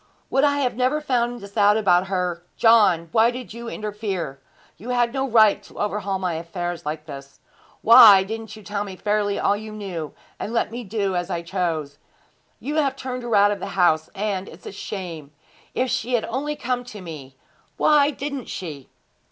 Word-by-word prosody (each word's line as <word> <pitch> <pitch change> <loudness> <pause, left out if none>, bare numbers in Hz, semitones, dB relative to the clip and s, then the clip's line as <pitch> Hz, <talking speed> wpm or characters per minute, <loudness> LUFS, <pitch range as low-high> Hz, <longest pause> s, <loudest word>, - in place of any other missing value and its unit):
Would 270 - +3
I 285 -1 +3
had 250 -4 0
never 255 +5 +1
found 245 -5 0
out 240 - -11
this 200 0 -10
about 205 -4 +4
her! 180 -3 -2 0.2
John, 200 -8 +4
why 225 +1 +4
did 245 -2 -7
you 235 0 -7
interfere? 205 -10 -4 0.4
You 225 +7 -9
had 240 -1 +1
no 270 0 -1
right 220 -3 +5
to - - -17
overhaul 200 -2 -1
my 185 -2 -2
affairs 170 0 -5
like 155 0 -4
this. 140 -2 -10 0.4
Why 210 -4 +9
didn't 220 +1 -6
you 215 - -13
tell 205 0 -3
me 195 -2 -8
fairly 205 +1 0
all 200 - +2
you 215 +1 -7
knew, 185 -7 -6 0.2
and 220 - -4
let 230 - 0
me 240 +1 -5
do 200 -2 -2
as 175 +1 -2
I 170 -2 -3
chose? 165 -5 -3 0.6
You 295 +3 -3
have 275 -3 +1
turned 255 -2 -5
her 240 -2 -1
out 205 0 +5
of 205 - -3
the - - -5
house, 160 -3 +3
and 195 -2 -2
it's 160 - -14
a - - -6
shame! 175 -7 -7 0.4
If 255 0 0
she 250 - -2
had 230 - 0
only 280 +5 -3
come 250 -2 -2
to 215 -4 -9
me! 150 -6 -9 0.4
Why 295 -1 +4
didn't 280 -2 -5
she?' 150 -7 -7
205 Hz, 195 wpm, -23 LUFS, 180-240 Hz, 0.6 s, Why